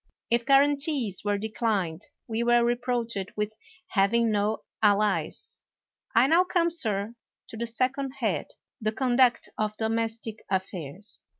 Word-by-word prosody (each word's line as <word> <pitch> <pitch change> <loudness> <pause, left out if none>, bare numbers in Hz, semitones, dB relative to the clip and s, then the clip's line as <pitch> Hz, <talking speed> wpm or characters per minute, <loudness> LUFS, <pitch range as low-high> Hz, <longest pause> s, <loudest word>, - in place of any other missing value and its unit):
If 235 +1 +2
guarantees 280 - +3
were 205 0 +1
declined, 205 -5 -2 0.2
we 225 0 -2
were 240 0 +4
reproached 240 -4 -1
with 210 0 -1 0.4
having 225 +3 +3
no 210 +1 0 0.2
allies. 210 -1 +1 0.5
I 230 +3 +6
now 330 +6 +5
come, 350 -2 +1
sir, 215 -9 -1 0.4
to - - -8
the 235 +1 -2
second 260 +3 -1
head 260 -5 -1 0.2
— - - -54
the 215 0 0
con 250 0 0
duct 250 -2 +4
of 215 0 -1
domestic 225 0 -2
affairs. 190 -1 -4
225 Hz, 135 wpm, -27 LUFS, 210-250 Hz, 0.5 s, I